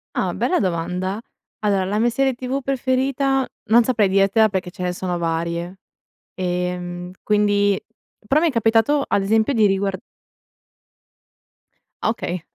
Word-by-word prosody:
Ah, - - 0
bella 365 - +1
domanda! 180 +2 -2 0.4
Allora, 200 -3 +1
la 205 +3 -1
mia 235 +2 +3
serie 265 +2 +1
TV 255 +2 -3
preferita 270 0 0 0.2
non 235 +2 +6
saprei 225 -4 +2
dirtela 195 +3 +4
perché 190 -2 -3
ce 180 - -7
ne 180 0 -1
sono 180 -1 -3
varie, 170 +2 -3 0.5
ehm, 180 0 -3
quindi 205 -1 +2 0.5
però 295 +7 +3
mi 340 - +3
è - - -2
capitato, 230 +4 +2
ad 200 - +1
esempio, 220 +6 +2
di 220 -4 +4
riguar 195 0 0 2.1
Ah, - - +2
okay. 180 -6 -4
205 Hz, 140 wpm, -21 LUFS, 180-240 Hz, 2.1 s, non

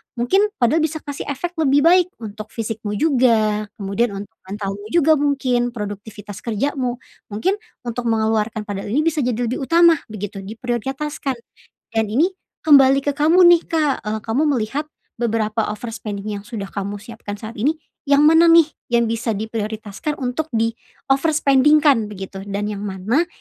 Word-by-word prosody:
mungkin, 380 - +2
padel 250 +6 +2
bisa 315 0 -2
kasih 285 -1 -6
efek 340 +5 -4
lebih 285 -2 +3
baik 355 +2 +5 0.2
untuk 215 0 -7
fisikmu 220 -2 -4
juga. 220 -6 +2
Kemudian, 200 +2 -1
untuk 205 +3 -8
mentalmu 200 +1 -5
juga 315 +2 +3
mungkin, 255 -4 0
produktivitas 205 -1 -7
kerjamu, 245 +2 -2 0.3
mungkin 365 - -1 0.2
untuk 240 0 -4
mengeluarkan 220 -1 0
padel 205 -1 -5
ini 275 +9 +1
bisa 320 -1 0
jadi 250 -4 0 0.2
lebih - - -2
utama 335 -2 +5
begitu 205 -2 -6
diprioritaskan 255 +7 -3 0.6
dan 225 0 +2
ini 325 - +2 0.3
kembali 275 -2 +7
ke 285 - +1
kamu 325 +5 +5
nih, 345 -1 +7
Kak. 305 -4 +2
Eee, 215 +1 -2
kamu 230 +6 +1 0.2
melihat 280 +8 -3 0.2
beberapa 225 -2 -1
overspending 210 -2 -6
yang 200 - -6
sudah 210 -2 -6
kamu 200 +1 -5
siapkan 215 -1 -8
saat 220 +2 -8
ini, 295 +9 0 0.3
yang 280 +1 +4
mana 325 +2 +6
nih 330 -2 +6 0.2
yang 235 -1 +1
bisa 230 0 -1
diprioritaskan 220 +5 -4
untuk 255 +5 -2
di 225 0 +2 0.4
overspending-kan 280 -3 +4
begitu, 195 -1 -8
dan 205 +1 -3
yang 205 - -5
mana, 210 - 0
235 Hz, 150 wpm, -20 LUFS, 210-290 Hz, 0.6 s, kembali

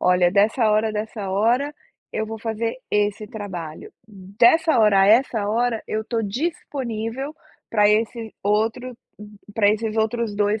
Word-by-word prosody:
"Olha, 180 -1 +3
dessa 215 +3 +3
hora 215 +1 +2
dessa 210 -2 -4
hora, 245 +9 +1 0.4
eu 220 - -2
vou 225 +1 -6
fazer 225 +1 -3
esse 210 0 0
trabalho, 185 -7 -7
dessa 225 - +2
hora 210 -3 +5
a 195 - +5
essa 220 -2 +3
hora, 230 +1 0
eu 220 0 -2
estou 225 0 -2
disponível 255 - -4 0.4
pra 210 -2 +4
esse 220 +1 0
outro, 225 +4 -1 0.2
hum 210 0 -12 0.2
pra 205 -2 +3
esses 220 +1 -2
outros 220 -1 0
2 205 +1 +1
220 Hz, 145 wpm, -22 LUFS, 205-230 Hz, 0.4 s, hora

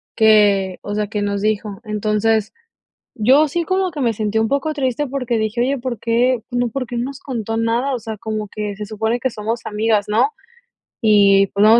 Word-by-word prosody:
que, 205 -4 +4
o 205 - -4
sea, 210 0 -1
que 210 0 -3
nos 200 -1 -1
dijo. 210 -1 -2
Entonces, 215 0 0 0.6
yo 265 +8 +5
sí 340 +4 -1
como 375 +2 0
que 300 -3 -5
me 240 -3 +2
sentía 215 0 -1
un 225 - 0
poco 280 +3 0
triste 280 0 -1
porque 250 -3 -2
dije: 220 +2 -1
"Oye, 270 +3 +1
¿por 245 -1 -4
qué?, 240 +3 +1
no 245 0 +1
¿por 255 +3 -3
qué 240 - -5
no 235 - -1
nos 275 0 -8
contó 225 -4 -4
nada?". 230 +4 0
O - - -4
sea, 220 -1 -6
como 215 0 -4
que 210 -1 -4
se 210 +1 -6
supone 220 +3 -2
que 260 - +1
somos 225 +1 -3
amigas, 215 -1 0
¿no? 225 - +2 0.7
Y, 200 -2 +5
pues, 200 - -1
no 215 - +7
vamos 225 +2 +7
225 Hz, 215 wpm, -19 LUFS, 210-250 Hz, 0.7 s, no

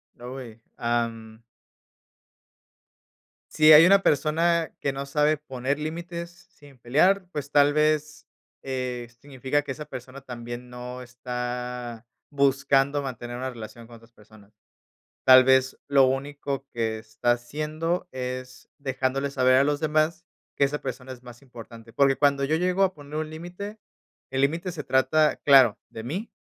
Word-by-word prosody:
No, 125 +2 -8
y 115 -3 -11 0.2
am 115 -1 -3 2.1
Si 155 0 +6
hay 155 +2 +10
una 195 +1 +5
persona 165 +3 +1
que 140 - 0
no 135 +1 -5
sabe 150 +2 +2
poner 135 -1 -3
límites 170 +2 -5 0.2
sin 145 -2 -18
pelear, 180 +11 +2
pues 145 -3 -5
tal 145 0 +4
vez, 155 0 0 0.3
eh, 125 -2 -4
significa 140 +1 -2
que 140 - -6
esa 150 +3 -6
persona 130 -1 -9
también 120 -1 -8
no 125 +1 -8
está 125 -1 -5 0.2
buscando 140 0 +2
mantener 120 -2 -6
una 130 +1 -3
relación 115 -1 -10
con 120 - -13
otras 115 +1 -18
personas. 105 -1 -20 0.7
Tal 130 0 +8
vez, 130 0 +3
lo 140 -1 +5
único 140 +1 -3
que 115 -2 -1
está 110 +2 -1
haciendo 155 +8 -2
es 125 0 -6
dejándole 135 0 -2
saber 130 -2 +3
a 130 - +5
los 145 0 0
demás 155 +2 0 0.3
que 140 - +4
esa 150 +2 -3
persona 130 0 -6
es 125 0 -15
más 120 0 -13
importante. 115 -3 -13
Porque 135 +1 +3
cuando 140 -1 +2
yo 155 +3 +1
llego 180 +3 +1
a 190 -1 +2
poner 145 -1 -11
un 155 0 -3
límite, 175 +7 -8 0.5
el 135 0 -1
límite 165 +6 0
se 150 - -6
trata, 145 +4 +2
claro, 135 -6 +5
de 110 - -8
mí, 180 - -5
135 Hz, 150 wpm, -25 LUFS, 125-150 Hz, 2.1 s, hay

